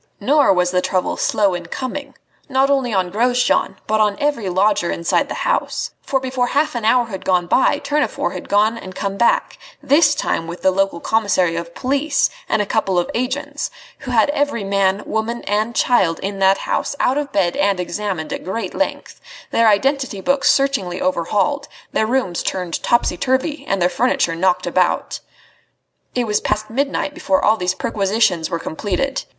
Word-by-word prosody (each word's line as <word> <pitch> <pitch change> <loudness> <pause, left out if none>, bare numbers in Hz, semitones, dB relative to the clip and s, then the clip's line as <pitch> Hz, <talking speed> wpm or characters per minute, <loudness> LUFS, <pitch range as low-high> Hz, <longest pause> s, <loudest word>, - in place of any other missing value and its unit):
Nor 285 +5 +4
was 180 -1 +2
the 180 0 +2
trouble 185 0 -1
slow 200 -3 +1
in 175 -1 -5
coming, 275 +6 -5 0.3
not 270 +1 +2
only 265 -4 +1
on 185 -3 0
Grosjean, 245 +4 +1
but 215 0 +1
on 210 -1 +2
every 285 -9 0
lodger 195 0 +2
inside 170 0 0
the - - -4
house; - - -1
for 265 - 0
before 255 -1 -1
half 290 +4 +1
an 240 -2 -4
hour 240 +2 +3
had 195 -5 -7
gone 180 -2 +2
by 260 +9 +3
Tournefort 295 +1 -1
had - - -8
gone 215 +3 +2
and 185 0 -10
come 195 -1 -3
back, 235 +4 +1 0.2
this 295 +1 +4
time 165 - -2
with 170 +1 -8
the 190 - +4
local 195 -2 0
commissary 190 -6 +1
of 170 0 -6
police 280 +3 +1 0.2
and 215 -1 +2
a - - -6
couple 195 -3 0
of 175 - 0
agents, 255 +4 -2 0.3
who 270 - -8
had 240 +2 +3
every 285 -7 -1
man, 195 0 +1
woman 225 +2 -2
and 215 +3 -1
child 190 -11 +2
in 195 0 -4
that 195 0 +4
house - - -1
out 265 +3 +2
of 285 -1 -4
bed 180 -7 +1
and 195 -1 +1
examined 180 -3 -3
at - - -5
great 190 0 -4
length, 290 - -3 0.3
their 230 0 +3
identity 260 +1 +1
books 275 +7 +3
searchingly 230 -11 0
overhauled, 200 - 0 0.2
their 220 - +1
rooms 235 -8 0
turned 180 -3 -3
topsy 235 -6 +1
turvy 265 - -1
and 195 - 0
their 175 - +3
furniture 205 -4 +1
knocked 180 +1 +1
about. 180 +1 0 1.0
It 245 -1 +1
was 210 -2 0
past 215 +1 -2
midnight 280 +3 -1
before 195 - 0
all 215 - +5
these 180 -3 -1
perquisitions 195 -5 0
were 170 - -1
completed. 205 +12 -3
210 Hz, 180 wpm, -19 LUFS, 185-260 Hz, 1.0 s, all